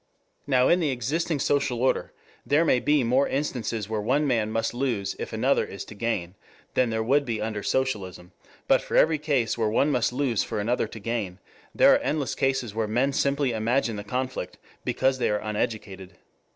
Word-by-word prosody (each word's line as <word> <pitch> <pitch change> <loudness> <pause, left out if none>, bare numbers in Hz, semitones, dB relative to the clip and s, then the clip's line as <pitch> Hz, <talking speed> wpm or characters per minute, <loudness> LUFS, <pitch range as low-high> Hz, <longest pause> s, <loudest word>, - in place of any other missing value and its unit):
Now 130 -2 +4
in 175 - +4
the 160 -4 +1
existing 145 +6 -1
social 140 -3 0
order 130 +2 +1 0.3
there 150 +4 +3
may 125 - +3
be 145 +2 +2
more 130 +4 +2
instances 120 -6 -2
where 110 -1 -2
one 135 +8 +1
man 115 -6 +1
must 115 +1 -1
lose 120 -6 -1
if - - -5
another - - +2
is - - -7
to - - -11
gain, 100 -5 -2 0.4
than 125 -2 +2
there 110 0 -1
would 140 +5 +3
be 115 -5 -3
under 105 -1 -3
socialism, 100 -9 -2 0.4
but - - +4
for - - -2
every 155 -1 +4
case 140 -7 0
where 110 -1 +2
one 140 +7 +2
must 125 -4 +1
lose 125 -4 0
for - - -3
another 115 +2 0
to 110 - -10
gain, 105 -4 -3 0.4
there - - +7
are - - +4
endless 145 -3 -1
cases 130 -5 -1
where 110 0 -1
men 125 +6 +1
simply 140 -1 +1
imagine 115 +1 0
the 105 - -5
conflict 125 -4 -4 0.3
because 130 0 +1
they - - +1
are 105 - +1
uneducated. 105 -3 -4
120 Hz, 190 wpm, -26 LUFS, 110-135 Hz, 0.4 s, there